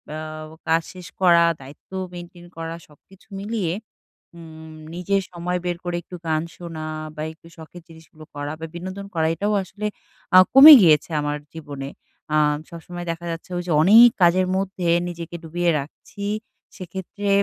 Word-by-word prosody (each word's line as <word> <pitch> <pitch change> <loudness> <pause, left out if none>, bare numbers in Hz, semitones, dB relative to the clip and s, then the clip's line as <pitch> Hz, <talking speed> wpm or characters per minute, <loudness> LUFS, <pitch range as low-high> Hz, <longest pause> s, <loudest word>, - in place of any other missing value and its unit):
আ - - -4 0.5
কাজ 165 +1 +3
শেষ 180 -1 -10
করা, 170 -2 +6 0.2
দায়িত্ব 140 +6 -15 0.2
মেইনটেইন 175 0 -10
করা 165 0 -5
সবকিছু 180 +6 -22
মিলিয়ে 200 -5 -2 0.6
উম 160 -1 -12 0.2
নিজের 195 +2 0
সময় 180 +1 -3
বের 175 -1 -1
করে 175 -1 -2
একটু 180 - -10
গান 155 -1 +1
শোনা 165 -3 -7 0.3
বা 150 - -4
একটু 165 +1 -21
শখের 165 +2 -12
জিনিসগুলো 160 -1 -15
করা 145 0 -4
বা 165 - -4
বিনোদন 185 +3 -6
করা 160 -1 +1
এটাও 205 +5 -1
আসলে 205 +3 -6 0.5
আ - - +11
কমে 285 +4 +11
গিয়েছে 155 -1 +4
আমার 145 0 -2 0.2
জীবনে। 145 -4 -7 0.5
আ - - +4 0.3
সবসময় 175 +1 -8
দেখা 165 +1 -5
যাচ্ছে 165 +2 -7
ঐযে 175 -2 -3
অনেক 225 +7 +9
কাজের 180 +2 +4
মধ্যে 190 -2 -2 0.2
নিজেকে 170 0 -7
ডুবিয়ে 175 +2 0
রাখছি। 200 +7 -10 0.5
সেক্ষেত্রে 190 +3 -6
175 Hz, 150 wpm, -22 LUFS, 160-185 Hz, 0.6 s, আ